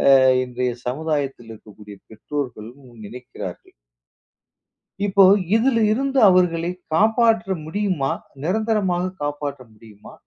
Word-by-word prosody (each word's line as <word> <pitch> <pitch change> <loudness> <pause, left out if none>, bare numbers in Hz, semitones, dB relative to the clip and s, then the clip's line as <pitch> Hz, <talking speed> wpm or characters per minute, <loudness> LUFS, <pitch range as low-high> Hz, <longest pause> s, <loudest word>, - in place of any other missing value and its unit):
ஆ - - +8 0.3
இன்றைய 125 0 -3
சமுதாயத்தில் 140 -4 -3
இருக்கக்கூடிய 105 -1 -14
பெற்றோர்களும் 125 +1 -7 0.2
நினைக்கிறார்கள். 125 +4 -9 1.3
இப்போ 195 0 +4 0.3
இதில் 230 0 +2
இருந்து 270 +3 -1
அவர்களை 175 -2 +2 0.2
காப்பாற்ற 220 +1 +2
முடியுமா? 175 -5 -2 0.3
நிரந்தரமாக 190 -1 0
காப்பாற்ற 145 -2 -4
முடியுமா? 105 -1 -16
155 Hz, 90 wpm, -21 LUFS, 125-200 Hz, 1.3 s, ஆ